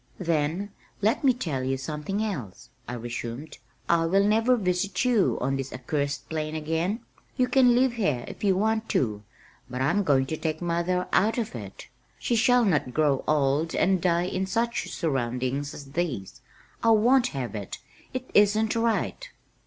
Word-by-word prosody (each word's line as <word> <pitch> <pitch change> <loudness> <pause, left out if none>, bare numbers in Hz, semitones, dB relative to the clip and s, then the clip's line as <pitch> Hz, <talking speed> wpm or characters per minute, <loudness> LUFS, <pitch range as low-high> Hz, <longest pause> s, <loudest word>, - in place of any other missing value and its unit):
"Then, 170 +3 -1 0.3
let 220 +7 +2
me 270 - +6
tell 160 - -3
you 135 +1 -1
something 150 +9 -3
else," 130 - -6 0.2
I 120 - -4
resumed. 120 +4 -6 0.3
"I 165 -1 +3
will 195 +4 +3
never 225 +4 +3
visit 195 +2 0
you 235 -6 +3
on 135 +2 0
this 135 0 -5
accursed 140 +2 -3
plain 155 -1 -3
again. 165 +8 -1 0.4
You 250 - +3
can 250 -1 +5
live 255 0 +3
here 150 - -1
if - - -9
you 195 -2 +3
want 220 +2 0
to, 105 -5 0 0.5
but 125 0 -5
I'm 140 +10 +2
going 135 -7 +3
to 155 +4 -4
take 155 -1 -2
mother 175 +1 -1
out 215 +5 +3
of 230 -3 -2
it. 105 -5 -8 0.3
She 240 - -1
shall 245 +1 +4
not 145 - 0
grow 145 -4 +2
old 150 +2 +1
and 190 -1 +2
die 175 0 +2
in 190 +1 -2
such 235 +3 -1
surroundings 135 -1 -2
as 140 -2 -10
these. 140 - -3 0.4
I 230 - +3
won't 240 +4 +5
have 125 -4 -3
it 100 -3 -6 0.3
it 255 0 -5
isn't 215 +2 +4
right." 230 - -1
170 Hz, 170 wpm, -26 LUFS, 135-220 Hz, 0.5 s, me